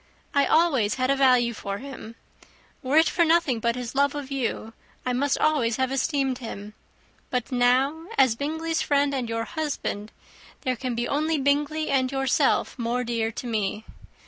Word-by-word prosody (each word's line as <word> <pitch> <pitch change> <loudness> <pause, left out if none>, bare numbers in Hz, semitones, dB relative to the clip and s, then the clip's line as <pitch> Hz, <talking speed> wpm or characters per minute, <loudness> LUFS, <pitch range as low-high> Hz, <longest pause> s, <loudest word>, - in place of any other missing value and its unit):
I 280 -1 +3
always 275 -11 +3
had 255 +1 +1
a - - +3
value 250 -3 +4
for 200 -2 -5
him. 260 -3 -9 0.7
Were 275 +2 +1
it 320 - +6
for 345 - +2
nothing 325 -7 +2
but 235 +1 0
his 245 -2 -5
love 280 +1 +2
of 285 -2 -6
you, 235 -4 -3 0.3
I 250 - 0
must 280 +3 +1
always 275 -7 +2
have 260 0 0
esteemed 270 -1 0
him; 210 -3 -7 0.6
but 250 -1 -2
now, 260 +6 +2
as 255 -4 +4
Bingley's 320 +5 -2
friend 285 0 +1
and 250 -4 -2
your 230 0 -1
husband, 275 -8 -4 0.5
there 255 -3 -1
can 250 0 -4
be 240 +1 -1
only 310 +2 0
Bingley 290 +3 0
and 260 -1 +1
yourself 270 -1 +1
more 240 +1 -1
dear 230 -2 -1
to 250 - -6
me. 215 -2 -2
260 Hz, 170 wpm, -25 LUFS, 235-285 Hz, 0.7 s, it